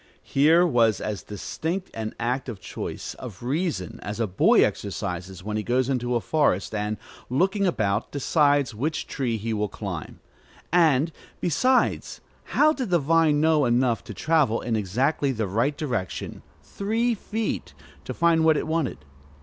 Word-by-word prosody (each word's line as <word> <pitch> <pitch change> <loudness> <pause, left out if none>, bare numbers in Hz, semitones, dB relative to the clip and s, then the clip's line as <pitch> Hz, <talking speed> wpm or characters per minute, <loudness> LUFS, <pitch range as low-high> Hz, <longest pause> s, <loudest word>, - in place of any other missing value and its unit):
Here 160 +5 +4
was 115 - +3
as 105 -2 -3
distinct 165 - -4
an 110 -1 -5
act 125 +3 -1
of 110 -5 -6
choice, - - -6
of 115 -5 -9
reason, 125 - -2
as 105 +2 -5
a 115 - +2
boy 95 -2 +4
exercises 95 -2 -4
when 105 +1 -3
he - - 0
goes 125 +3 0
into 125 -2 0
a - - +3
forest, 140 - +1
and, 105 0 -2 0.3
looking 190 - +2
about, 105 - 0
decides 145 -2 +2
which 145 +9 -2
tree 120 -5 -2
he 110 +2 -3
will 105 -1 0
climb. - - -6 0.5
And, 160 -3 +4 0.3
besides, 255 - +1 0.3
how 310 +1 +3
did 260 -8 -4
the 175 - +4
vine 160 0 +3
know 155 -2 +3
enough 120 -1 +2
to - - -7
travel 150 -8 +2
in 115 -1 -2
exactly 130 - 0
the 110 -4 -1
right 115 +10 0
direction, 120 - -3 0.2
three 225 +4 0
feet, 220 +1 -4 0.3
to - - -4
find 170 -1 +3
what 160 -1 +5
it - - -2
wanted? 155 - -2
130 Hz, 160 wpm, -25 LUFS, 110-160 Hz, 0.5 s, what